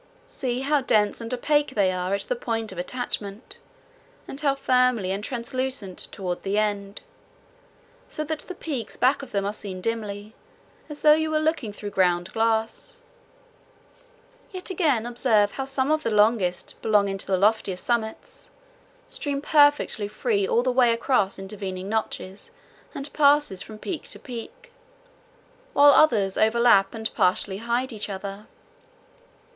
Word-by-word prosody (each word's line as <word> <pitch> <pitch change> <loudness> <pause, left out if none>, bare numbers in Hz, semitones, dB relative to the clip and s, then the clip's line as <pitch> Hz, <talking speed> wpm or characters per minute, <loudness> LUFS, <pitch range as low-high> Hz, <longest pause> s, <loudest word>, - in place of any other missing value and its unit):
See 250 -1 -3
how 290 +1 +2
dense 215 -4 +1
and 230 +1 -6
opaque 290 +2 +1
they 195 -3 +3
are 185 +1 -1
at 200 - -3
the - - -2
point 225 - -3
of 185 - -7
attachment, 205 +1 -4 0.7
and 275 - -6
how 280 -2 +2
filmy 250 -7 +2
and 200 +2 -3
translucent 250 -4 -3 0.2
toward 180 -2 -4
the 200 +1 -1
end, 205 -1 -1 1.1
so 305 - -3
that 310 0 -3
the 370 - -6
peaks 275 -8 -5
back 260 +3 +3
of 275 - -9
them 200 -4 -1
are 205 - -2
seen 195 -3 -6
dimly, 210 0 -4 0.6
as 295 -1 -8
though 300 -1 +7
you 315 0 +1
were 310 0 +1
looking 310 -8 -1
through 205 0 -7
ground 175 -2 +1
glass. 225 - 0 1.5
Yet 375 -3 -6
again 295 -11 +1
observe 230 -4 +2
how 270 - -4
some 270 +1 -1
of 310 0 +2
the 230 - -1
longest, 210 -4 +1
belonging 200 -3 +2
to - - -4
the 190 -1 +2
loftiest 200 -2 +1
summits, 225 -2 -2 0.6
stream 285 -1 -3
perfectly 290 -8 +3
free 405 - 0
all 470 0 +2
the - - +1
way 245 -1 +4
across 230 -4 +1
intervening 195 -1 -6
notches 210 - -4 0.5
and 280 +1 -6
passes 285 -9 +3
from 215 - -9
peak 325 - -5
to - - -5
peak, 265 - -9 1.0
while 285 0 +7
others 215 -11 +4
overlap 220 -3 +4
and 220 0 -3
partly 190 +1 +1
hide 235 +3 -1
each 215 -1 -4
other. 200 +1 -6
230 Hz, 150 wpm, -25 LUFS, 200-275 Hz, 1.5 s, though